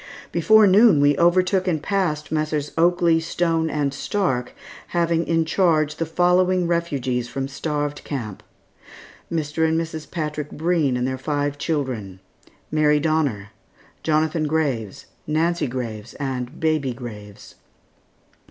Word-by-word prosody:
Before 220 Hz, -1 st, +5 dB
noon 200 Hz, -3 st, +6 dB
we 145 Hz, 0 st, +4 dB
overtook 185 Hz, +2 st, +3 dB
and 165 Hz, -4 st, +1 dB
passed 165 Hz, -4 st, -1 dB
Messrs. 155 Hz, -2 st, -1 dB
Oakley, 170 Hz, 0 st, +3 dB
Stone, 165 Hz, -1 st, 0 dB
and 145 Hz, -2 st, -1 dB
Stark, 140 Hz, -6 st, -1 dB, 0.3 s
having 170 Hz, -1 st, 0 dB
in 165 Hz, -1 st, +2 dB
charge 160 Hz, -3 st, +1 dB
the 165 Hz, -, -2 dB
following 180 Hz, +2 st, +2 dB
refugees 140 Hz, -8 st, -1 dB
from 135 Hz, +1 st, -3 dB
Starved 145 Hz, +1 st, -3 dB
Camp: 115 Hz, -9 st, -5 dB, 0.9 s
Mr. 160 Hz, -1 st, -1 dB
and 160 Hz, 0 st, +2 dB
Mrs. 160 Hz, -1 st, -5 dB
Patrick 150 Hz, -3 st, -4 dB
Breen 160 Hz, -5 st, 0 dB
and 125 Hz, -, -1 dB
their 130 Hz, 0 st, -3 dB
five 145 Hz, 0 st, -2 dB
children; 130 Hz, -, -3 dB, 0.5 s
Mary 150 Hz, -1 st, +3 dB
Donner, 145 Hz, -10 st, 0 dB, 0.5 s
Jonathan 155 Hz, 0 st, +1 dB
Graves, 140 Hz, -10 st, -2 dB, 0.2 s
Nancy 165 Hz, +1 st, +1 dB
Graves, 120 Hz, -3 st, -6 dB
and 130 Hz, -3 st, -4 dB
baby 155 Hz, -5 st, 0 dB
Graves. 105 Hz, -5 st, -10 dB
155 Hz, 125 wpm, -22 LUFS, 135-170 Hz, 0.9 s, noon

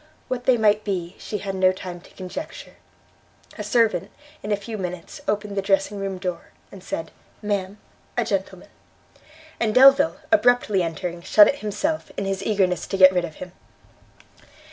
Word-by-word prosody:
What 250 Hz, -1 st, -3 dB
they 255 Hz, -2 st, +4 dB
might 215 Hz, -1 st, +3 dB
be, 180 Hz, -4 st, -3 dB
she 210 Hz, -, -4 dB
had 195 Hz, -1 st, -5 dB
no 185 Hz, -1 st, +3 dB
time 180 Hz, -2 st, -8 dB
to -, -, -18 dB
conjecture; 190 Hz, -, -8 dB, 0.8 s
a 210 Hz, -, -5 dB
servant, 215 Hz, -4 st, +1 dB, 0.3 s
in 210 Hz, -, -5 dB
a -, -, +4 dB
few 220 Hz, +3 st, -7 dB
minutes, 180 Hz, -3 st, -6 dB
opened 205 Hz, 0 st, -2 dB
the 195 Hz, -, 0 dB
dressing 195 Hz, +1 st, 0 dB
room 195 Hz, -1 st, -3 dB
door, 180 Hz, -2 st, -5 dB, 0.2 s
and 190 Hz, -2 st, -12 dB
said, 165 Hz, -3 st, -5 dB, 0.3 s
"Ma'am, 200 Hz, -1 st, -2 dB, 0.4 s
a -, -, +1 dB
gentleman;" -, -, -3 dB, 0.9 s
and 220 Hz, -2 st, 0 dB
Delvile, 270 Hz, +4 st, +6 dB
abruptly 245 Hz, -, +3 dB
entering, 170 Hz, +1 st, -4 dB
shut 205 Hz, +4 st, +6 dB
it 285 Hz, -, 0 dB
himself, 300 Hz, +10 st, -2 dB
in 195 Hz, -, -2 dB
his 195 Hz, 0 st, -2 dB
eagerness 190 Hz, -5 st, 0 dB
to 195 Hz, -, -3 dB
get 185 Hz, 0 st, +8 dB
rid 180 Hz, -1 st, +1 dB
of 160 Hz, -2 st, -10 dB
him. 180 Hz, -1 st, -9 dB
195 Hz, 165 wpm, -23 LUFS, 185-215 Hz, 0.9 s, get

